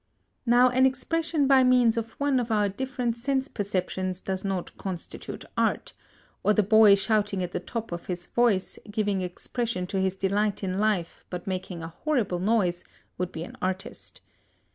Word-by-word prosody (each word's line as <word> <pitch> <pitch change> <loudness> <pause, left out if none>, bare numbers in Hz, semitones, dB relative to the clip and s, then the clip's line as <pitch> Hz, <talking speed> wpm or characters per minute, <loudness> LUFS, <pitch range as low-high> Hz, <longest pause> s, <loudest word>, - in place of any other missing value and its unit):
Now 245 +1 +6
an 260 +1 +5
expression 305 +3 0
by 265 -1 +6
means 250 -3 +4
of 230 -1 -3
one 280 -2 +1
of 240 -1 -2
our 210 -2 +3
different 245 +3 -2
sense 265 +2 0
perceptions 185 -3 -2
does 190 -1 -4
not 190 -3 -3
constitute 185 -3 -6
art, - - 0 0.5
or 210 - +3
the 210 - +4
boy 215 0 +7
shouting 205 -2 +1
at 175 - -4
the - - -2
top 230 -4 -5
of 170 0 -6
his 175 -1 -4
voice, 225 -5 +1
giving 205 -2 0
expression 185 +2 -2
to 190 +1 -2
his 190 0 0
delight 200 +2 0
in 185 0 -1
life 205 -6 0
but 180 -1 -5
making 185 -3 -4
a 165 - -5
horrible 235 - 0
noise, 185 -3 +1 0.4
would 180 -1 -2
be 160 - -5
an - - -9
artist. 185 +1 -4
205 Hz, 170 wpm, -27 LUFS, 185-240 Hz, 0.5 s, boy